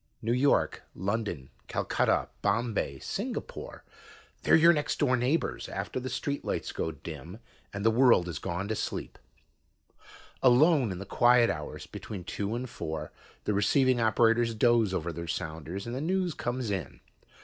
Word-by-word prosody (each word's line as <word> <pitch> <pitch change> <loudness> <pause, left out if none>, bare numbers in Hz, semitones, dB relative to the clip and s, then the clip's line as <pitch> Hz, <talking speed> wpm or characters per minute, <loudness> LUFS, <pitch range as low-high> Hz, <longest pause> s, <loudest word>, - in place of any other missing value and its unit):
New 115 +2 0
York, 135 +3 +2
London, 100 - -3 0.2
Calcutta, - - +1
Bombay, 105 - 0
Singapore - - -5 0.6
they're - - +5
your 170 +2 +7
next 150 -2 -1
door 130 -3 +3
neighbors 130 +7 -1
after - - -4
the 130 +1 -5
streetlights 140 +3 -3
go 80 - -2
dim 80 +4 -9 0.3
and 100 +1 -5
the 115 - +6
world 120 -6 +5
has 85 -5 -5
gone 95 +3 -3
to 110 - 0
sleep. - - -4 1.2
Alone 130 - +5
in 90 - -4
the 100 - -6
quiet 120 +3 +4
hours 75 -2 -6
between 100 -4 -7
two 100 +4 -3
and 125 +2 -3
four, 80 -9 -5 0.3
the 105 - 0
receiving 125 +5 +3
operators 115 +1 +3
doze 115 -2 +3
over 85 -2 -2
their 85 +1 -6
sounders 80 +4 -4
and 120 - -5
the 130 - -3
news 180 +1 0
comes 120 -3 -3
in. 95 -5 -4
115 Hz, 150 wpm, -29 LUFS, 90-125 Hz, 1.2 s, your